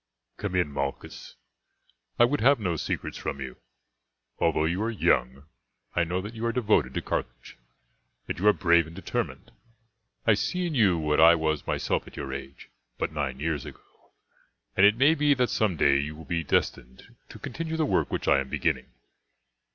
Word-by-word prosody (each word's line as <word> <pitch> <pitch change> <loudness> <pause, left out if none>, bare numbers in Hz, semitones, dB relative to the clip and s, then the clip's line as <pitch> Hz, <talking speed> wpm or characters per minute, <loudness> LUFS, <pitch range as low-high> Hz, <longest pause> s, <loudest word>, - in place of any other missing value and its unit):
"Come 100 -3 -4
in, 90 -5 +1
Malchus, 70 0 -5 0.8
I 120 - +7
would 145 +4 -1
have 135 +2 +5
no 90 -5 -1
secrets - - -4
from - - -4
you. 65 -2 -7 0.8
Although 80 -2 +2
you 85 +5 -1
are 110 - 0
young 70 - 0 0.5
I 85 - +3
know 90 +2 -2
that 105 +4 -8
you 115 0 -7
are - - +1
devoted 115 -3 +1
to - - -2
Carthage, - - -5 0.7
that - - -5
you 100 - +1
are - - +9
brave 85 -3 +3
and 80 - -12
determined. 95 - -4 0.7
I 110 - +5
see 180 - -1
in 170 - -2
you 100 - +3
what 75 -1 0
I 85 +1 +8
was 80 -2 -1
myself - - -1
at - - -13
your 70 -2 -5
age, 70 -1 -9 0.3
but - - -2
nine 70 -3 -3
years 75 -1 -2
ago, - - -15 0.6
and 95 +1 +7
it 105 +2 +2
may 140 +5 +5
be 145 -2 +3
that 125 -2 +1
some 105 -5 +1
day 70 -1 +4
you 75 +2 -4
will 80 +1 -11
be 85 -1 -2
destined 65 -3 -2
to - - -10
continue 160 +5 -5
the 160 - +1
work - - +1
which - - -3
I 70 - +5
am 65 -1 -4
beginning. - - -1
85 Hz, 190 wpm, -27 LUFS, 75-115 Hz, 0.8 s, are